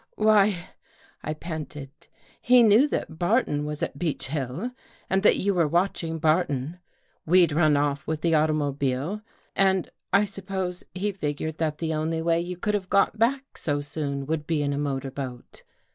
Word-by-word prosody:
" - - -39
Why," 210 -4 +3 0.5
I 155 - -3
panted, 150 -4 -6 0.3
" - - -30
he 250 -1 +8
knew 225 +6 +6
that 160 - -4
Barton 175 - +1
was 150 0 -4
at 140 - -4
Beech 155 -5 -2
Hill 150 - -3 0.4
and 190 0 +3
that 210 - +5
you 200 +1 +1
were 170 -4 +2
watching 170 0 0
Barton. 155 -1 0 0.5
We'd 175 -1 +5
run 155 -1 +3
off 145 -1 -1
with 155 -1 -2
the 165 -1 +2
automobile 150 +2 0 0.3
and 190 -2 +2 0.2
I 200 +1 +4
suppose 190 -2 -4
he 205 +3 -1
figured 155 -3 -4
that 155 -2 -1
the 160 0 -2
only 160 +1 -1
way 165 0 +2
you 175 +1 -5
could 210 +4 -1
have 195 -3 -2
got 200 +2 +2
back 265 +4 0
so 145 -2 -1
soon 145 -1 -4
would 155 0 -2
be 155 -3 +1
in 145 0 0
a 140 - -2
motor 135 -2 -2
boat. 130 -3 -7
160 Hz, 175 wpm, -26 LUFS, 145-190 Hz, 0.5 s, he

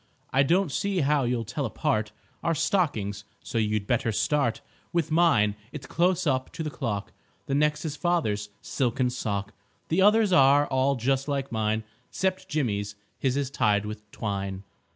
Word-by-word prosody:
I 135 - +5
don't 170 +4 +2
see 195 +3 0
how 145 -1 +2
you'll 120 -1 0
tell 135 +4 -2
apart 110 -1 -1 0.3
Our 165 - +1
stockings, 125 - 0 0.2
so 115 - -2
you'd 105 -1 0
better 115 0 +1
start 130 +2 +1 0.3
With 170 -3 0
mine; 155 -12 +4 0.2
it's 145 -4 -7
close 180 +3 +1
up 130 -3 0
to 160 - -4
the 155 - -3
clock; 115 -9 -3 0.3
The 135 - -3
next 150 +2 +1
is 155 -2 -3
father's 130 - 0
silken 125 -1 0
sock; 100 -5 -3 0.4
The 165 +4 +2
others 210 0 +5
all 140 -1 +5
are 135 +1 +2
just 135 +3 0
like 140 -2 -2
mine, 110 -1 0 0.3
'Cept 190 0 -2
Jimmy's 105 -8 -1 0.2
his 135 0 +1
is 140 -1 -1
tied 105 -6 +2
with 105 0 -8
twine. 100 -2 -4
135 Hz, 165 wpm, -27 LUFS, 110-155 Hz, 0.4 s, I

